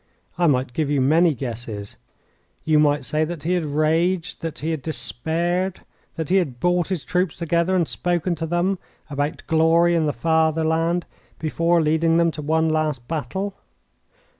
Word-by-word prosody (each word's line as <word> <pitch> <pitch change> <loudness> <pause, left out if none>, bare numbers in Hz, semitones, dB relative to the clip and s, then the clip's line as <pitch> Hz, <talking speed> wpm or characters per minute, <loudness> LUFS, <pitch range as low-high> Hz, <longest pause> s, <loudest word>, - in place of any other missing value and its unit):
I 175 0 +2
might 130 -3 +1
give 150 +1 -1
you 145 -1 +2
many 155 +4 +4
guesses. 115 -5 -6 0.7
You 155 -1 +4
might 150 -1 +2
say 155 +1 0
that 160 -1 -5
he 175 +3 0
had 175 -3 0
raged, 160 +4 0
that 165 -2 -4
he 160 +2 -2
had 160 -3 -3
despaired, 170 +5 -2 0.3
that 160 -1 -4
he 190 - +4
had 140 -10 -1
brought 175 +1 +1
his 185 -6 -3
troops 180 -2 0
together 170 +2 +1
and 170 -4 +2
spoken 175 0 -1
to 165 0 -4
them 175 +3 0 0.3
about 145 +1 -2
glory 165 +2 +4
and 165 -2 +2
the - - +2
fatherland 160 +4 +1 0.3
before 165 +1 +1
leading 160 +2 +2
them 170 0 +3
to 155 - -7
one 160 +2 +1
last 155 -6 -1
battle. 165 +6 -3
160 Hz, 165 wpm, -22 LUFS, 150-175 Hz, 0.7 s, many